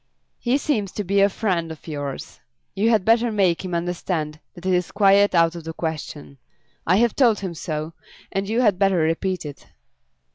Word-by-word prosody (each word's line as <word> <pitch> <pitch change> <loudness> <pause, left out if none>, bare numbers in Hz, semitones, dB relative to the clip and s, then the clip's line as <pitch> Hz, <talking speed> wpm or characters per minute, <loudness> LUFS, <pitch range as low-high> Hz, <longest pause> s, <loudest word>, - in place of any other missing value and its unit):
He 250 +3 +1
seems 220 -10 -1
to 210 - -3
be 200 +1 +2
a 200 - +5
friend 180 -6 -1
of 160 - -11
yours. 145 -3 -6 0.3
You 205 +4 +1
had 220 -5 +2
better 230 +1 +3
make 190 -5 +1
him 180 -2 -3
understand 170 -3 -3 0.2
that 175 - -12
it 190 - +2
is 180 -1 0
quite 200 -1 +4
out 165 -1 +4
of 170 - -7
the 165 +1 -6
question. 155 -4 -6 0.5
I 180 - +4
have 235 +2 +2
told 235 -7 +3
him 185 -3 -4
so, 155 -1 -5 0.4
and 195 +1 -2
you 230 +3 +1
had 205 -6 +2
better 195 -2 +3
repeat 165 +3 0
it." 145 -2 -9
185 Hz, 190 wpm, -22 LUFS, 165-205 Hz, 0.5 s, a